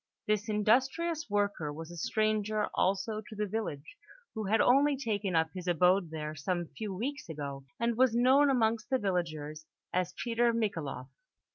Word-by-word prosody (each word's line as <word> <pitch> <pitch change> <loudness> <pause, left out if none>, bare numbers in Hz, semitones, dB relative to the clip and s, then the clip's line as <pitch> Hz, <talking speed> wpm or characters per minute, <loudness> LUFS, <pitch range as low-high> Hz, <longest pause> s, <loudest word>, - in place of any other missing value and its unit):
This 215 +1 0
industrious 265 +9 +1
worker 205 -7 0
was 160 +3 -8
a - - -8
stranger 215 +3 0
also 200 +3 0
to 215 +1 -11
the 210 0 -1
village, 185 -8 -5 0.4
who 220 -2 -4
had 220 +3 +2
only 280 +3 +4
taken 210 -7 -1
up 160 -1 +2
his 180 -1 -7
abode 180 +1 +3
there 155 -1 -5
some 170 +3 -2
few 215 -2 -4
weeks 250 +6 -4
ago, 140 -3 -6
and 235 0 +1
was 250 -1 +3
known 265 +4 +5
amongst 230 -3 +1
the 260 - +3
villagers 155 -7 -3 0.3
as 180 0 -1
Peter 235 0 +1
Michaeloff. 165 - -2
210 Hz, 160 wpm, -31 LUFS, 170-230 Hz, 0.4 s, known